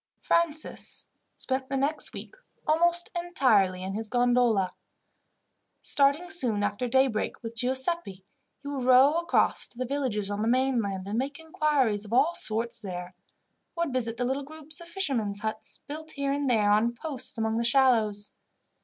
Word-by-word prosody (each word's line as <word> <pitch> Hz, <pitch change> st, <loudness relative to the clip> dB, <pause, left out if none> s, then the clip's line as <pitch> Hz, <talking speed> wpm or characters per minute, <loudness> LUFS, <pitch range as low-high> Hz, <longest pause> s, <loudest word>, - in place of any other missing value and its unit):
Francis 325 Hz, -2 st, -1 dB, 0.3 s
spent 260 Hz, 0 st, -3 dB
the 275 Hz, -, -1 dB
next 285 Hz, +4 st, -1 dB
week -, -, -9 dB, 0.3 s
almost 345 Hz, +2 st, +2 dB
entirely 220 Hz, -, +2 dB
in 190 Hz, +1 st, -4 dB
his 220 Hz, +1 st, -3 dB
gondola. 245 Hz, -6 st, +2 dB, 1.1 s
Starting 285 Hz, +5 st, +2 dB
soon 245 Hz, -, 0 dB
after 205 Hz, +4 st, -1 dB
daybreak 255 Hz, -2 st, +1 dB
with 230 Hz, 0 st, -5 dB
Giuseppi, 260 Hz, -, -1 dB, 0.4 s
he -, -, -8 dB
would 275 Hz, -3 st, -3 dB
row 265 Hz, +5 st, +6 dB
across 340 Hz, -, +2 dB
to -, -, -19 dB
the 255 Hz, -, -2 dB
villages 240 Hz, -7 st, -1 dB
on 205 Hz, +1 st, -2 dB
the 220 Hz, -, 0 dB
mainland, 230 Hz, -7 st, 0 dB
and 215 Hz, +3 st, -1 dB
make 280 Hz, +2 st, -3 dB
inquiries 295 Hz, -9 st, +1 dB
of 215 Hz, +1 st, -7 dB
all 280 Hz, +7 st, +4 dB
sorts 230 Hz, -4 st, +2 dB
there; 180 Hz, -2 st, -6 dB, 0.6 s
or 340 Hz, 0 st, 0 dB
would 280 Hz, -, -5 dB
visit 230 Hz, -3 st, -1 dB
the 245 Hz, -, -1 dB
little 265 Hz, +3 st, -1 dB
groups 310 Hz, +2 st, -7 dB
of 340 Hz, -, -10 dB
fishermen's 240 Hz, -, -2 dB
huts, 220 Hz, 0 st, -5 dB
built 315 Hz, +2 st, -7 dB
here 280 Hz, -2 st, -2 dB
and 285 Hz, -1 st, -1 dB
there 210 Hz, -4 st, +3 dB
on 225 Hz, +3 st, +2 dB
posts 275 Hz, -1 st, -5 dB
among 225 Hz, 0 st, 0 dB
the -, -, 0 dB
shallows. 230 Hz, -5 st, +2 dB
255 Hz, 160 wpm, -27 LUFS, 220-285 Hz, 1.1 s, row